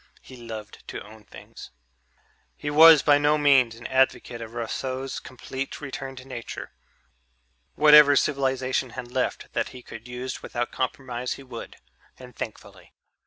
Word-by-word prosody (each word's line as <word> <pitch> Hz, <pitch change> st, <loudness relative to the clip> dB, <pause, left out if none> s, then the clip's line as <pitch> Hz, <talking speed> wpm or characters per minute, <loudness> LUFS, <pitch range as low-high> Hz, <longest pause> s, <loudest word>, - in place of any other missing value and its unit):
He 130 Hz, -, -13 dB
loved 110 Hz, -3 st, -9 dB
to -, -, -6 dB
own 110 Hz, 0 st, -15 dB
things. -, -, -12 dB, 0.9 s
He 145 Hz, -, -4 dB
was 160 Hz, -1 st, +8 dB
by 145 Hz, -1 st, +5 dB
no 145 Hz, +1 st, +3 dB
means 135 Hz, -6 st, +4 dB
an 120 Hz, -, -13 dB
advocate 130 Hz, -2 st, +1 dB
of 115 Hz, +1 st, -9 dB
Rousseau's 130 Hz, +3 st, -4 dB
complete 130 Hz, +1 st, -7 dB
return 135 Hz, -2 st, -6 dB
to 125 Hz, 0 st, -11 dB
nature; 120 Hz, -3 st, -7 dB, 1.0 s
whatever 150 Hz, -1 st, +8 dB
civilization 130 Hz, -2 st, 0 dB
had 120 Hz, -1 st, -7 dB
left 130 Hz, 0 st, -2 dB
that -, -, -1 dB
he 125 Hz, -1 st, -12 dB
could 115 Hz, +2 st, -11 dB
use 125 Hz, +1 st, -6 dB
without 120 Hz, 0 st, -3 dB
compromise, 130 Hz, -2 st, -3 dB
he 135 Hz, -, -11 dB
would 125 Hz, -3 st, -9 dB, 0.4 s
and 125 Hz, -2 st, -13 dB
thankfully. 110 Hz, -, -9 dB
130 Hz, 145 wpm, -25 LUFS, 120-135 Hz, 1.0 s, was